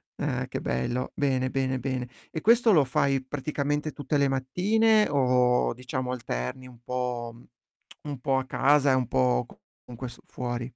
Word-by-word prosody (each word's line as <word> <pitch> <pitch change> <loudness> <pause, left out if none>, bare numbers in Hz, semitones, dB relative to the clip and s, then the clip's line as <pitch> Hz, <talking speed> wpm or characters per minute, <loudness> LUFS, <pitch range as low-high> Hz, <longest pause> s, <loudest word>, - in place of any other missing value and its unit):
Eh, - - -2
che - - -5
bello. 120 - -2
Bene, 130 -2 +1
bene, 130 0 -1
bene. 130 -1 -3 0.2
E 160 - -3
questo 230 +2 +5
lo 150 -7 +5
fai 135 +1 +1
praticamente 145 +2 -2
tutte 145 +1 -2
le 140 - +3
mattine 210 +12 +2
o, 125 -4 +3
diciamo, 125 +1 -4
alterni 115 - -4
un 125 -2 -15
po' 125 -2 -3 0.7
un 145 -3 -5
po' 135 0 +1
a 130 - -1
casa 140 +2 +3
e - - +4
un 130 -2 0
po' 65 - +2
c - - -16 0.3
con 125 - -10
questo, 120 -2 -8
fuori. 120 -1 -4
130 Hz, 165 wpm, -27 LUFS, 125-145 Hz, 0.7 s, questo